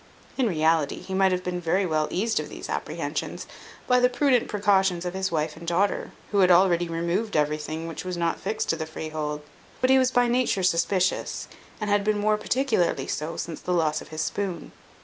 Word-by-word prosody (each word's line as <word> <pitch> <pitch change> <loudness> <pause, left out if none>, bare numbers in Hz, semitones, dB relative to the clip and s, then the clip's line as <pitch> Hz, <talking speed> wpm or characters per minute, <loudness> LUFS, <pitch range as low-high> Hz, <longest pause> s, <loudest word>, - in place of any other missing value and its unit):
In 260 -3 +1
reality, 160 -4 +2
he 190 - -7
might 190 0 +3
have 180 0 -1
been 180 -1 -3
very 180 +4 +1
well 155 -3 0
eased 220 +5 0
of - - -5
these - - -8
apprehensions, - - -3 0.4
by 250 0 +4
the 250 0 +4
prudent 250 -1 +2
precautions 195 -4 +2
of 180 - -3
his 190 -1 -2
wife 155 -1 -1
and 170 +1 -11
daughter, 185 +4 +1 0.2
who 205 - +2
had 185 -1 +5
already 175 -1 +4
removed 170 +6 -1
everything 150 +2 -1
which 165 - -6
was 180 -1 -4
not 170 -1 0
fixed 215 +3 -3
to - - +2
the 160 -1 -5
freehold; 155 -1 -4 0.4
but 255 - +3
he 265 - +6
was 255 -1 +3
by 245 -1 +3
nature 240 -5 +1
suspicious, 185 +1 +1 0.3
and 210 -2 -2
had 205 0 +3
been 210 0 +1
more 210 +1 +2
particularly 230 -6 0
so 155 +2 -4
since 165 -3 -5
the 180 - -2
loss 155 -3 +1
of - - -11
his 155 0 -5
spoon. 185 -2 -3
180 Hz, 205 wpm, -25 LUFS, 165-205 Hz, 0.4 s, he